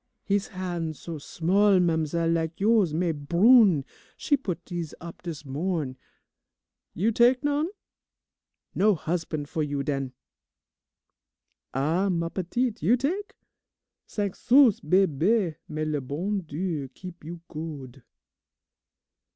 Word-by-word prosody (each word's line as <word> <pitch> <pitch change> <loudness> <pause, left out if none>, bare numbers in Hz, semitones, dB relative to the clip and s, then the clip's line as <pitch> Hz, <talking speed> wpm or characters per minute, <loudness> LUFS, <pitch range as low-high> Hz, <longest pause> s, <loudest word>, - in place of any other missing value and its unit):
He's 200 0 0
hans' 175 -4 -4
so 165 -3 -6
small, 190 +6 +3
ma'amzelle, 165 -1 +1
lak 165 0 -2
you's, 210 -4 +3
mais 165 +2 0
brune. 175 - +5 0.3
She 290 - +2
put 180 - -5
dese 170 -4 -5
up 170 0 -10
dis 165 -4 -7
morn'. 150 -1 -2 1.0
You 210 +7 +2
tak' 245 +4 +4
none? 290 +2 +1 1.1
No 210 +1 +3
husban' 160 -2 -3
fo' 150 - -6
you 145 -2 -1
den! 135 -2 -2 1.6
"Ah, 165 +9 +1
ma 170 -2 0
petite, 220 +7 -2
you 245 - +4
tak'? 360 +11 -2 0.7
Cinq 205 -3 -2
sous, 255 -4 +5
bebe, 185 +2 +2
may 155 0 -3
le 150 -2 -1
bon 175 +10 -2
Dieu 160 -3 -3
keep 180 -3 -10
you 170 +2 -7
good! 145 -5 -7
170 Hz, 120 wpm, -26 LUFS, 155-200 Hz, 1.6 s, brune